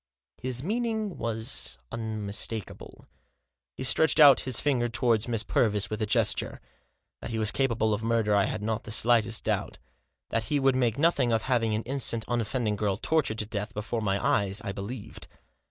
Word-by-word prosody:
His 130 0 -3
meaning 220 0 -2
was 115 +2 -3
unmistakable. 110 -2 -4 0.7
He - - -4
stretched 150 +5 +4
out 145 -4 +8
his 125 - +1
finger 130 -5 +1
towards 115 -1 +1
Miss 115 -2 -1
Purvis 105 -3 +1
with 110 +1 -3
a 110 - 0
gesture. - - +1 0.6
That - - -7
he 115 - -3
was 110 -1 +1
capable 115 -5 +1
of 105 - -2
murder 115 -2 +1
I 100 -1 +3
had 105 - -4
not 110 0 -2
the - - -10
slightest 115 0 +2
doubt. - - -2 0.5
That 115 -1 -1
he 145 +6 0
would 135 -1 +3
make 120 -3 +1
nothing 145 -6 +2
of 110 -1 +1
having 115 -4 +1
an 110 - -2
innocent, 120 -3 -1
unoffending 115 -2 -1
girl 100 -2 -1
tortured 135 -2 0
to 110 - 0
death 105 0 -5
before 110 +2 -3
my 100 -2 0
eyes 100 +1 +1
I 100 - -3
believed. 100 +4 -7
115 Hz, 175 wpm, -27 LUFS, 105-130 Hz, 0.7 s, out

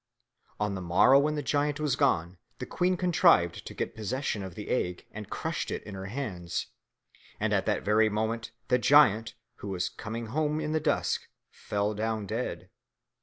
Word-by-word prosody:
On 105 -1 0
the 95 - -4
morrow 100 +10 +5
when 150 +2 +1
the 145 - -2
giant 145 +2 0
was 150 -4 +1
gone, 90 - +1 0.2
the - - -5
queen 180 +1 0
contrived 170 - +3
to - - -7
get - - -3
possession 110 0 -2
of 95 -3 -7
the 105 - -7
egg 90 -7 -1
and 105 -2 -8
crushed - - -3
it - - -4
in 100 - -9
her 95 0 -6
hands, 95 -8 -4 0.7
and - - 0
at - - +1
that - - 0
very 110 +1 +4
moment 110 +2 -2 0.2
the 125 0 +4
giant, 115 -3 +5 0.2
who - - -8
was 95 -2 -1
coming 115 +2 -6
home 155 0 +1
in 155 -1 -2
the 155 - +1
dusk, 155 - 0 0.2
fell 105 +1 -2
down 110 0 -2
dead. 115 +5 -4
110 Hz, 180 wpm, -29 LUFS, 100-145 Hz, 0.7 s, morrow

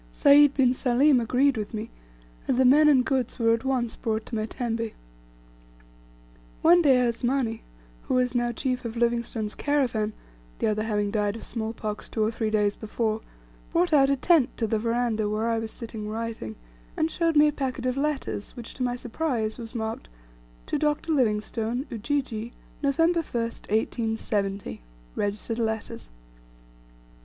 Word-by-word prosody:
Sayd 285 - +6
bin 255 -3 +4
Salim 260 +2 +3
agreed 255 +3 +2
with 210 +1 -4
me, 220 +2 -5 0.6
and 255 - +1
the 260 - +4
men 295 +4 +6
and 265 -4 +5
goods 260 -3 -1
were 230 -2 +3
at 230 - -1
once 255 -3 -1
brought 220 -2 -2
to - - -13
my 215 -1 -1
tembe. 230 -2 -3 1.7
One 345 +2 +7
day 280 -5 +5
Asmani, 240 -1 0 0.5
who - - +1
was 250 -1 +2
now 240 -1 +1
chief 255 +1 -2
of 230 0 -5
Livingstone's 235 -2 -1
caravan, 245 -7 0 0.4
the - - -1
other 215 0 +1
having 210 -2 -1
died 205 -1 0
of 230 - -8
small 220 -1 -3
pox, 215 -2 -5
two 220 - 0
or 215 - +1
three 225 -1 -2
days 210 -1 +1
before, 220 0 -2 0.5
brought 345 -1 +2
out 275 -2 +5
a 280 - +3
tent 280 -1 +3
to 230 - 0
the 220 0 0
veranda 230 -2 0
where, 215 +2 -1
I 230 -1 +1
was 225 0 -4
sitting 220 -2 -7
writing, 220 - -5 0.4
and 320 +1 +1
shewed 330 -1 +1
me 300 +1 +7
a - - -4
packet 260 -3 -3
of 255 0 0
letters, 280 -7 -3
which 235 -1 -8
to - - -10
my 245 -1 0
surprise 245 -3 -2
was 230 +1 -8
marked: 220 -1 -4 0.6
"To - - -1
Dr. 300 +2 0
Livingstone, 230 -1 0
"Ujiji, 235 -1 -2 0.3
"November 330 +4 +2
1st, 230 -6 -4
1870. 210 - -1 0.3
"Registered 210 +3 -2
letters." 220 - -3
235 Hz, 165 wpm, -26 LUFS, 220-265 Hz, 1.7 s, One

